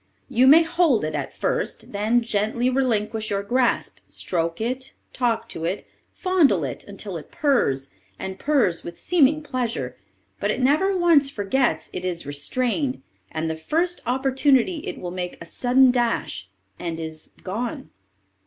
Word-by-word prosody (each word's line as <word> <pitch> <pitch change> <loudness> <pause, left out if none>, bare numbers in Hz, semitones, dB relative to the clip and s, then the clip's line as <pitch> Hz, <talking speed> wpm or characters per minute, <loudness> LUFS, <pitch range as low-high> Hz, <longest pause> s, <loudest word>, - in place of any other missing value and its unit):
You 255 +3 +4
may 315 +5 +8
hold 330 -8 +2
it 155 - -3
at - - -3
first, - - -2
then 215 +4 +2
gently 230 +3 0
relinquish 225 -4 0
your 200 -1 -1
grasp, 245 +4 0
stroke 165 -2 -2
it, 255 +4 -3 0.2
talk 240 -3 0
to 160 - -6
it, 180 +5 -2 0.3
fondle 325 - +3
it, 130 -3 -4
until 200 -2 -6
it 155 - -11
purrs, 140 - +1 0.3
and 190 0 -6
purrs 265 - +2
with 170 0 -8
seeming 310 -3 +3
pleasure, 235 - -3 0.4
but 205 - 0
it 230 - 0
never 310 +9 +3
once 330 -6 +4
forgets 245 +2 0
it 180 - -4
is 175 -3 -3
restrained, 250 - -1 0.3
and 160 0 -2
the 160 - -2
first 330 - -1
opportunity 265 +4 +2
it - - -4
will 175 -1 -5
make 180 -1 -4
a 170 - -9
sudden 250 +7 +4
dash, 235 - -1 0.3
and 165 -1 -4
is 160 -1 -7
gone. 245 +9 -4
235 Hz, 155 wpm, -24 LUFS, 180-270 Hz, 0.4 s, may